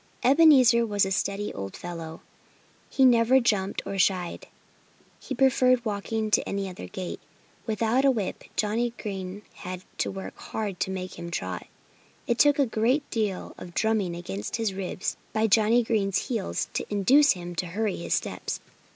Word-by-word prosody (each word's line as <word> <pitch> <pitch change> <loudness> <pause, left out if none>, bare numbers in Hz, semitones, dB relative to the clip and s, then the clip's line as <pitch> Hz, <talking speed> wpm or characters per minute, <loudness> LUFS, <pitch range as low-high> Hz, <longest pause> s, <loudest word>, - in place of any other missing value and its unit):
Ebenezer 265 -5 +6
was 205 -3 +1
a 190 - -3
steady 200 +2 -1
old 95 0 -6
fellow. 165 -2 -7 0.7
He 265 - +3
never 245 +1 +5
jumped 205 -5 0
nor 195 0 -4
shied. 185 -2 0 0.7
He 265 - -5
preferred 255 -1 +3
walking 215 +1 -2
to - - +2
any 195 0 -2
other 185 -1 -8
gait. 185 -2 -6 0.5
Without 225 +4 +1
a 275 - +6
whip 220 -8 -2
Johnnie 230 +3 0
Green 195 -1 -6
had 185 -1 -7 0.2
hard - - -1
work 195 0 -5
to - - -1
make 185 -1 -5
him 170 - -6
trot. 95 - -4 0.6
It 235 - 0
took 290 -1 +5
a 280 - +4
great 245 +5 +1
deal 210 -5 -2
of 175 - -10
drumming 215 -6 +1
against 105 - -5
his 225 -4 -1
ribs 190 -1 -3 0.2
by 220 0 +2
Johnnie 225 +3 +4
Green's 210 -1 0
heels 225 -6 -2
to - - -1
induce 255 +9 +5
him 175 -1 -7
to 180 - -1
hurry 205 +3 -2
his - - -1
steps. - - -3
210 Hz, 160 wpm, -26 LUFS, 185-235 Hz, 0.7 s, Ebenezer